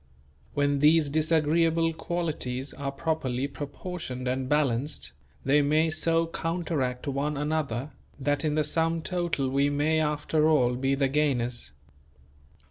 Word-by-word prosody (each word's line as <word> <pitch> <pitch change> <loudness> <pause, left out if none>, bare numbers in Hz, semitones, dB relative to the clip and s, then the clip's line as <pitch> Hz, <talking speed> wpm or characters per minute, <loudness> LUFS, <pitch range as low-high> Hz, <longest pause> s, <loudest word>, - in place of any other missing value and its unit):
When 145 0 +2
these 150 0 +4
disagreeable 165 +1 +2
qualities 155 -6 -3
are 140 -1 -4
properly 140 -4 -1
proportioned 140 -2 -6
and 130 0 -1
balanced, 145 - 0 0.3
they 145 +2 +4
may 155 +3 +2
so 165 +1 +2
counteract 165 -6 -2
one 140 +2 -1
another, 150 -3 -2 0.3
that 145 +1 0
in 150 -1 0
the 155 - +2
sum 165 +2 0
total 175 -6 -1
we 140 +1 +2
may 150 +2 +1
after 150 0 +1
all 125 -6 +3
be 135 +2 0
the 135 0 +2
gainers. 130 -4 0
150 Hz, 130 wpm, -27 LUFS, 135-160 Hz, 0.3 s, these